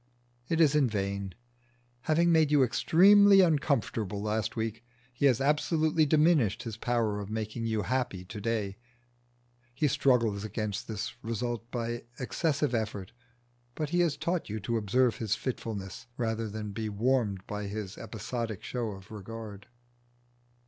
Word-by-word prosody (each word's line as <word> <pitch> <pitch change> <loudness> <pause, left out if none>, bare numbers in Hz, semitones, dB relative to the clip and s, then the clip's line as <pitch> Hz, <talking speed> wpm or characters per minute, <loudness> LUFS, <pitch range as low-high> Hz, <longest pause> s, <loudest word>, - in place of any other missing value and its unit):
It 165 - +1
is 155 -4 +5
in 145 -4 +3
vain. 100 -2 -3 0.7
Having 170 +2 +4
made 160 -2 +4
you 145 -2 +5
extremely 195 - +6
uncomfortable 140 - +1
last 110 +1 -2
week 115 0 -3 0.3
he 140 +3 +3
has 125 -3 +3
absolutely 155 +2 +2
diminished 150 - +3
his 115 -3 -5
power 115 -2 0
of 100 -1 -6
making 110 +1 -3
you 110 -2 0
happy 120 -5 -2
to 105 +3 -8
day: 105 -3 -2 1.0
he 150 +3 +2
struggles 115 -7 +2
against 110 0 -3
this 110 -2 -4
result 115 0 -3
by 120 -1 -3
excessive 140 +1 0
effort, 105 -4 -3 0.6
but 155 -2 -3
he 175 - +2
has 165 -4 +2
taught 170 +1 -2
you 110 +1 -3
to 115 +4 -2
observe 115 +2 +2
his 110 -2 0
fitfulness 115 -3 -5
rather 115 -2 -1
than 105 0 -5
to - - -8
be 110 - -2
warmed 105 -3 0
by 105 -1 -4
his 105 -1 -5
episodic 110 -1 -5
show 120 -4 -3
of 95 0 -13
regard. 105 -1 -8
115 Hz, 150 wpm, -29 LUFS, 105-140 Hz, 1.0 s, extremely